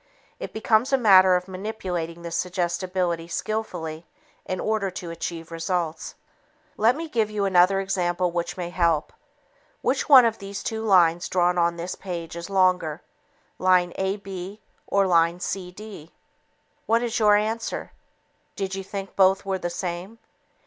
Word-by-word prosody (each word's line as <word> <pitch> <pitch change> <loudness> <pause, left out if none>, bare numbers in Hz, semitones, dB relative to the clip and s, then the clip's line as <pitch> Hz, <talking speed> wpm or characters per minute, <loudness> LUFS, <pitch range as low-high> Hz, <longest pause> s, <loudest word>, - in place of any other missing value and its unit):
It - - -6
becomes 220 +3 +1
a 270 - +4
matter 190 -6 +6
of 180 +1 -2
manipulating 185 -4 -5
this 170 0 -4
suggestibility 175 -1 -1
skillfully 170 -5 -4 0.4
in 185 - -3
order 215 -2 0
to 175 -2 -7
achieve 165 0 -6
results. 165 -1 -3 0.6
Let 230 +4 +3
me 325 +2 -5
give 225 -7 0
you 210 -2 -1
another 190 0 +4
example 180 -2 0
which 170 +1 -3
may 175 -1 -4
help. 170 -4 +1 0.7
Which - - 0
one 260 -4 +9
of 225 -1 0
the 195 0 -8
two 220 +2 -3
lines 175 -5 +3
drawn 180 -1 +2
on 170 0 +2
this 175 +2 -5
page 170 -4 -6
is 170 +3 -7
longer? 185 -5 +1 0.6
Line 180 -1 +3
AB 195 0 -4 0.3
or 200 0 +2
line 170 -1 +3
CD? 185 -2 -7 0.8
What 230 +1 +3
is 240 0 -1
your 210 -1 +5
answer? 220 +2 -2 0.6
Did 195 -2 -3
you 195 0 -4
think 195 0 -7
both 190 0 +4
were 190 -1 -1
the 175 - -3
same? 175 +4 -5
185 Hz, 150 wpm, -24 LUFS, 175-200 Hz, 0.8 s, one